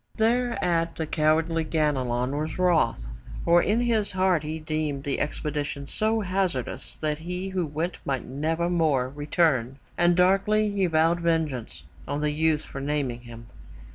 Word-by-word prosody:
'' -, -, -38 dB
Thereat 220 Hz, -8 st, +1 dB
the 160 Hz, -, -2 dB
cowardly 160 Hz, +2 st, +1 dB
Ganelon 135 Hz, -5 st, 0 dB
was 155 Hz, +4 st, -3 dB
wroth, 165 Hz, -, +2 dB, 0.4 s
for 175 Hz, +1 st, +5 dB
in 215 Hz, +6 st, +1 dB
his 220 Hz, -5 st, +1 dB
heart 185 Hz, -3 st, +2 dB
he 155 Hz, +1 st, -4 dB
deemed 155 Hz, -3 st, -3 dB
the 140 Hz, -1 st, -2 dB
expedition 145 Hz, -1 st, -3 dB
so 220 Hz, +9 st, 0 dB
hazardous 185 Hz, -, -2 dB
that 150 Hz, -1 st, -2 dB
he 180 Hz, +3 st, -4 dB
who 185 Hz, -3 st, -1 dB
went 160 Hz, +4 st, -3 dB
might 135 Hz, -3 st, -2 dB
nevermore 160 Hz, -1 st, 0 dB
return, 145 Hz, -3 st, 0 dB, 0.2 s
and 175 Hz, 0 st, +4 dB
darkly 200 Hz, +3 st, +3 dB
he 195 Hz, -2 st, +1 dB
vowed 165 Hz, +1 st, +2 dB
vengeance 160 Hz, -8 st, -1 dB, 0.2 s
on 145 Hz, +1 st, -2 dB
the 150 Hz, 0 st, +1 dB
youth 155 Hz, 0 st, +1 dB
for 135 Hz, -, -7 dB
naming 140 Hz, -4 st, -2 dB
him. 115 Hz, -1 st, -11 dB
160 Hz, 150 wpm, -26 LUFS, 145-180 Hz, 0.4 s, for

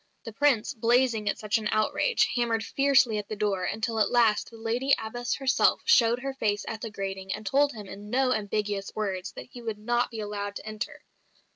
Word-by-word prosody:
The 225 Hz, -, -8 dB
Prince, 265 Hz, -3 st, +2 dB
blazing 235 Hz, -2 st, +2 dB
at -, -, -1 dB
such 215 Hz, +1 st, 0 dB
an 215 Hz, -1 st, -3 dB
outrage, 215 Hz, -, +2 dB
hammered 230 Hz, -2 st, +1 dB
fiercely 270 Hz, -5 st, +3 dB
at 205 Hz, -, -8 dB
the 215 Hz, -, -3 dB
door 200 Hz, -3 st, -1 dB
until 220 Hz, +3 st, -2 dB
at 210 Hz, -, +3 dB
last 230 Hz, -3 st, +3 dB
the 230 Hz, -, -13 dB
Lady 235 Hz, +5 st, +1 dB
Abbess 240 Hz, +2 st, -3 dB
herself 270 Hz, -1 st, +2 dB
showed 240 Hz, -, +5 dB
her 275 Hz, +1 st, -3 dB
face 210 Hz, -5 st, -1 dB
at 220 Hz, -1 st, -5 dB
the 230 Hz, -, -4 dB
grating, 195 Hz, -2 st, -5 dB
and 215 Hz, -, -10 dB
told 285 Hz, +6 st, +2 dB
him 210 Hz, -3 st, -8 dB
in 205 Hz, +2 st, -10 dB
no 255 Hz, +2 st, +2 dB
ambiguous 205 Hz, -1 st, -2 dB
words 195 Hz, -4 st, -3 dB
that -, -, -10 dB
he 245 Hz, -, -10 dB
would 225 Hz, -2 st, -4 dB
not 240 Hz, +3 st, 0 dB
be 225 Hz, -, -7 dB
allowed 205 Hz, -1 st, -4 dB
to -, -, -7 dB
enter! 215 Hz, -1 st, -6 dB
220 Hz, 210 wpm, -27 LUFS, 210-245 Hz, -, showed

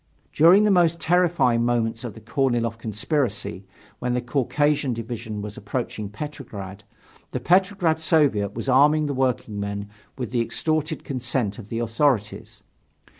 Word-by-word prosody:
During 175 Hz, +7 st, +6 dB
the 210 Hz, -, +4 dB
most 170 Hz, -3 st, +3 dB
terrifying 170 Hz, -9 st, +2 dB
moments 115 Hz, -1 st, 0 dB
of 120 Hz, -4 st, -6 dB
the 110 Hz, -, -12 dB
Korniloff 120 Hz, -2 st, 0 dB
conspiracy, 110 Hz, -, -2 dB, 0.3 s
when 125 Hz, 0 st, -1 dB
the -, -, +1 dB
Caucasian 140 Hz, +2 st, 0 dB
division 115 Hz, -2 st, -5 dB
was 105 Hz, 0 st, -7 dB
approaching 105 Hz, -1 st, -4 dB
Petrograd, 105 Hz, -6 st, -8 dB, 0.5 s
the 125 Hz, -, -1 dB
Petrograd 180 Hz, +1 st, +2 dB
Soviet 140 Hz, -, +2 dB
was 115 Hz, +3 st, -5 dB
arming 150 Hz, +4 st, +4 dB
the 145 Hz, -, -2 dB
workingmen 100 Hz, -6 st, -2 dB, 0.3 s
with 125 Hz, -4 st, -4 dB
the 120 Hz, -2 st, +1 dB
extorted 155 Hz, +5 st, -1 dB
consent 120 Hz, -5 st, -2 dB
of 105 Hz, -2 st, -11 dB
the 115 Hz, -, -3 dB
authorities. 115 Hz, -1 st, -1 dB
125 Hz, 135 wpm, -24 LUFS, 110-150 Hz, 0.5 s, During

